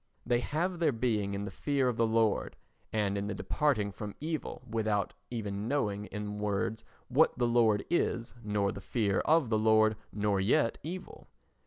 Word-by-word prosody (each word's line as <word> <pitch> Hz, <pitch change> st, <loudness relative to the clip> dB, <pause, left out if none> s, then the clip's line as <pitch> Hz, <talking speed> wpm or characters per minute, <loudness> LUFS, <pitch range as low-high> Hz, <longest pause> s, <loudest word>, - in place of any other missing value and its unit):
They 120 Hz, -, +2 dB
have 170 Hz, +7 st, -1 dB
their 160 Hz, -4 st, +3 dB
being 110 Hz, -5 st, 0 dB
in 100 Hz, +1 st, -3 dB
the 100 Hz, -, -5 dB
fear 140 Hz, +5 st, 0 dB
of 125 Hz, -, +1 dB
the 115 Hz, 0 st, +2 dB
Lord 110 Hz, -2 st, +1 dB, 0.4 s
and 100 Hz, -2 st, 0 dB
in 100 Hz, -, -3 dB
the 100 Hz, -, -3 dB
departing 110 Hz, -5 st, 0 dB
from 105 Hz, +1 st, -7 dB
evil 155 Hz, -3 st, -4 dB
without 110 Hz, -2 st, 0 dB, 0.2 s
even 105 Hz, -3 st, -3 dB
knowing 105 Hz, -7 st, 0 dB
in 105 Hz, 0 st, -5 dB
words 105 Hz, +1 st, -1 dB, 0.2 s
what 145 Hz, +6 st, +3 dB
the 125 Hz, -, +2 dB
Lord 115 Hz, -3 st, +3 dB
is, 120 Hz, -8 st, 0 dB
nor 105 Hz, -2 st, 0 dB
the 100 Hz, -, -8 dB
fear 100 Hz, -3 st, 0 dB
of 155 Hz, -6 st, +3 dB
the 110 Hz, -, +3 dB
Lord, 110 Hz, 0 st, +4 dB, 0.2 s
nor 105 Hz, -1 st, 0 dB
yet 115 Hz, +6 st, +2 dB
evil. 180 Hz, +5 st, -7 dB
110 Hz, 175 wpm, -31 LUFS, 105-125 Hz, 0.4 s, Lord